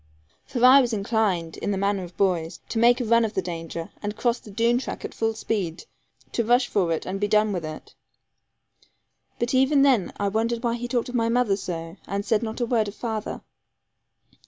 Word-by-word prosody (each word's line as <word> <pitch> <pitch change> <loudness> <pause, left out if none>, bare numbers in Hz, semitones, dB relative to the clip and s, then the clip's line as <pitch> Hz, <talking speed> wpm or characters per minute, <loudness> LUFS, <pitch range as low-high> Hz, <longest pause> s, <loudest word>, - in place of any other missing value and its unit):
For 245 0 +2
I 265 +2 +9
was 245 -2 -1
inclined, 200 -6 0
in - - -3
the 200 - 0
manner 200 0 0
of 175 0 -11
boys, 175 -3 0
to 225 - -1
make 240 +2 +5
a 245 - -1
run 230 +1 +4
of 220 -1 -2
the 190 - +1
danger, 165 -1 -6
and 205 0 -4
cross 240 0 +1
the - - -14
Doone 230 +4 +2
track 260 - -6
at - - -7
full 225 0 -1
speed; 195 -7 -3 0.5
to 235 - 0
rush 245 +2 +3
for 180 -5 +1
it, 160 - -2
and 190 +1 -3
be 205 - +1
done 210 0 +3
with 175 -3 -3
it. 155 0 -8 1.4
But 240 +2 -1
even 270 +2 +4
then 255 -9 +3
I 200 - +1
wondered 230 +3 -1
why 235 -1 +1
he 240 +1 -4
talked 245 0 -1
of - - -7
my 230 -2 +1
mother 235 -4 +2
so, 170 -2 -6
and 200 +1 -3
said 220 -1 +2
not 220 0 -4
a 240 - +1
word 230 -3 +1
of 205 - -7
father. 220 -3 -4
220 Hz, 215 wpm, -25 LUFS, 195-240 Hz, 1.4 s, I